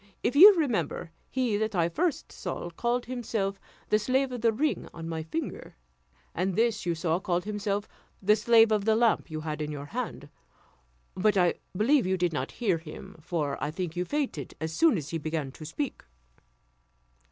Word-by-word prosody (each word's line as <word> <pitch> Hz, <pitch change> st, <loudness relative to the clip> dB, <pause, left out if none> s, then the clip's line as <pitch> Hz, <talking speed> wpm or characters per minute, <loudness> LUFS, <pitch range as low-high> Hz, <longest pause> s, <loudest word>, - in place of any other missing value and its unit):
If 255 Hz, -, 0 dB
you 395 Hz, +7 st, +10 dB
remember, 225 Hz, -, -1 dB, 0.2 s
he 250 Hz, -5 st, 0 dB
that 215 Hz, 0 st, -1 dB
I 170 Hz, -2 st, +3 dB
first 310 Hz, -, -1 dB
saw 175 Hz, -2 st, -5 dB
called 240 Hz, +7 st, -1 dB
himself 220 Hz, -6 st, -2 dB, 0.3 s
the 215 Hz, -, +4 dB
slave 260 Hz, +4 st, +1 dB
of 245 Hz, -2 st, -5 dB
the 230 Hz, -1 st, +4 dB
ring 285 Hz, +7 st, -1 dB
on 165 Hz, -1 st, -6 dB
my 165 Hz, -1 st, -3 dB
finger; 160 Hz, +1 st, -5 dB, 0.6 s
and 185 Hz, +1 st, -1 dB
this 225 Hz, -4 st, +1 dB
you 170 Hz, -, +1 dB
saw, 165 Hz, +1 st, 0 dB
called 180 Hz, -1 st, -1 dB
himself 205 Hz, -1 st, -2 dB, 0.3 s
the 210 Hz, +2 st, +4 dB
slave 225 Hz, +1 st, +5 dB
of 210 Hz, -2 st, +1 dB
the 220 Hz, 0 st, +4 dB
lamp 230 Hz, -4 st, +2 dB
you 155 Hz, -1 st, -4 dB
had 155 Hz, -1 st, -4 dB
in 150 Hz, 0 st, -3 dB
your 145 Hz, -1 st, -6 dB
hand; 220 Hz, -, -5 dB, 0.8 s
but 200 Hz, +2 st, +2 dB
I 180 Hz, -2 st, +4 dB, 0.2 s
believe 250 Hz, +1 st, +3 dB
you 190 Hz, 0 st, +1 dB
did 175 Hz, -2 st, 0 dB
not 135 Hz, -2 st, -3 dB
hear 195 Hz, -9 st, 0 dB
him, 160 Hz, 0 st, -10 dB
for 155 Hz, -5 st, -2 dB
I 150 Hz, -, 0 dB
think 175 Hz, 0 st, -4 dB
you 180 Hz, -, 0 dB
fainted 255 Hz, -, -3 dB
as 160 Hz, +1 st, -3 dB
soon 315 Hz, -, +4 dB
as 150 Hz, -2 st, -5 dB
he 165 Hz, -, -2 dB
began 155 Hz, -3 st, -3 dB
to 155 Hz, -, -11 dB
speak." 265 Hz, -, -4 dB
195 Hz, 185 wpm, -28 LUFS, 165-235 Hz, 0.8 s, you